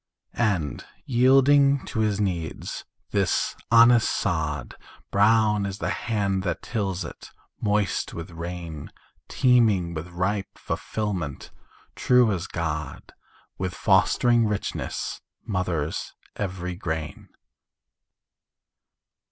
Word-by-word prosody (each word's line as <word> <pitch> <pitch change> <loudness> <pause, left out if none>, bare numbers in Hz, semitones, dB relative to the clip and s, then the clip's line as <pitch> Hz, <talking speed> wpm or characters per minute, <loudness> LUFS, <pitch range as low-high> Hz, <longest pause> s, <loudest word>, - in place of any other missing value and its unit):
And 90 - 0 0.2
yielding 135 +2 +4
to - - -4
his 105 -2 +1
needs, 90 -6 -3 0.3
this 100 -3 +1
honest 115 0 +6
sod, 75 -7 -1 0.4
Brown 105 0 +4
as 95 0 -5
the - - -2
hand 100 -4 -1
that 85 -3 -3
tills 95 -6 -2
it, - - -10 0.3
moist 105 -1 0
with 85 +1 -7
rain, 85 -2 -7 0.4
Teeming 110 -9 +3
with 80 +1 -5
ripe 95 +3 -2
fulfilment, 95 - -4 0.4
true 125 -3 +4
as 95 -3 -2
God, 75 -5 -4 0.5
With 95 -2 -3
fostering 115 +3 +3
richness, 105 -1 -3 0.2
mothers 90 -6 -2 0.2
every 90 -2 -4
grain. 80 -4 -5
95 Hz, 95 wpm, -25 LUFS, 85-110 Hz, 0.5 s, honest